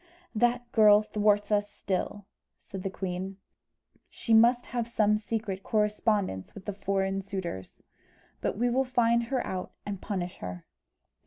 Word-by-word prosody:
"That 240 +1 +1
girl 210 -1 +7
thwarts 205 -1 +2
us 205 0 +2
still," 200 +1 -3 0.3
said 195 - -8
the 195 - -2
queen. 190 0 -4 0.7
"She 230 - -1
must 240 +2 +6
have 240 -2 -2
some 210 -3 +3
secret 210 -3 -3
correspondence 210 - 0
with 200 0 -6
foreign 195 0 0
suitors. 185 - -6 0.6
But - - -1
we 240 +2 +2
will 260 +2 +3
find 235 -2 +2
her 255 +1 -1
out 185 -1 -4
and 200 -2 -4
punish 185 -3 -3
her." 90 -1 -7
205 Hz, 140 wpm, -29 LUFS, 190-230 Hz, 0.7 s, girl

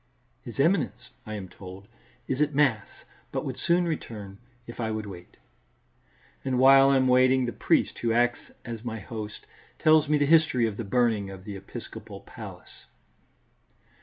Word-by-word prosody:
"His 120 - -10
Eminence," 165 0 +1 0.2
I 110 - -5
am 100 -3 -6
told, 95 +1 -11 0.4
"is 130 +2 -1
at 150 -1 +1
Mass, 120 -8 +2 0.4
but - - -3
would - - -5
soon 175 +1 +2
return, 105 - -5 0.3
if 120 - -10
I 110 -2 -1
would 110 -1 -3
wait." 90 -3 -11 1.1
And 130 -1 -1
while 135 +1 +7
I 140 - +4
am 130 -1 +3
waiting, 130 0 +4
the 120 - -2
priest, - - +1
who 115 - 0
acts 120 +1 +1 0.2
as 115 -2 -6
my 115 -2 -4
host, 105 0 -8 0.3
tells 155 -1 +4
me 150 - +4
the 145 - +2
history 155 -6 +4
of 110 -2 -3
the 115 - -3
burning 110 -2 +1
of 95 -1 -10
the 100 0 -7
episcopal 95 0 -9
palace. - - -12
120 Hz, 165 wpm, -27 LUFS, 105-135 Hz, 1.1 s, while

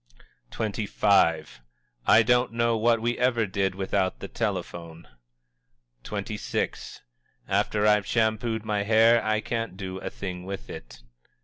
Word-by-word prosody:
_" 110 -1 -3
XXV. 85 -9 +2 0.5
"I 115 - +7
don't 125 +1 +2
know 115 0 +1
what 115 +1 +2
we 120 +1 -1
ever 120 -3 +2
did 95 -1 -1
without 95 -1 -1
the - - -6
telephone!" 85 -1 -4 1.0
XXVI. - - -4 0.5
"After 105 0 +1
I've 105 -1 +3
shampooed 110 0 0
my 105 -1 0
hair 115 +2 +4
I 110 0 0
can't 115 -5 -4
do 95 -1 -5
a - - -5
thing 90 -2 -6
with 95 +1 -7
it!" - - -11
105 Hz, 130 wpm, -26 LUFS, 95-115 Hz, 1.0 s, I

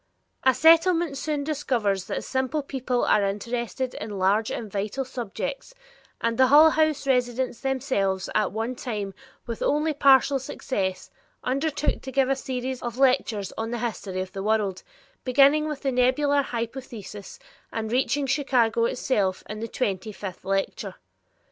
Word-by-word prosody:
A 260 -1 +4
Settlement 330 -1 +5
soon 290 +1 -2
discovers 240 - -1
that - - -3
simple 265 +3 -1
people 260 -3 -1
are 210 - +3
interested 235 +5 -2
in 210 -1 -6
large 200 +4 +2
and 220 -4 -5
vital 210 +7 -2
subjects, 255 - -5 0.4
and 230 +1 -1
the 260 - +7
Hull 305 +4 +8
House 310 -2 +1
residents 250 -2 0
themselves 200 -8 -1
at 215 - +1
one 225 +4 -2
time, 210 -6 -4 0.3
with 230 -2 -5
only 305 +2 +1
partial 275 -1 +5
success, 190 -7 -3 0.3
undertook 280 +3 -1
to 265 - -7
give 270 -1 +2
a 270 - +3
series 260 -1 -4
of 240 0 -5
lectures 255 -7 +2
on 225 0 -2
the 240 - -2
history 210 -5 -3
of 185 0 -6
the 195 0 -5
world, 205 -2 0 0.4
beginning 280 +4 +4
with 300 -3 -4
the 270 - +1
nebular 260 +3 +3
hypothesis 230 -5 -6 0.3
and 220 -1 -3
reaching 265 +3 +1
Chicago 255 -5 +2
itself 205 -6 0
in 215 - -6
the 230 - -4
twenty 210 -3 -2
fifth 195 -3 -8
lecture! 195 +1 -2
250 Hz, 150 wpm, -25 LUFS, 210-275 Hz, 0.4 s, Hull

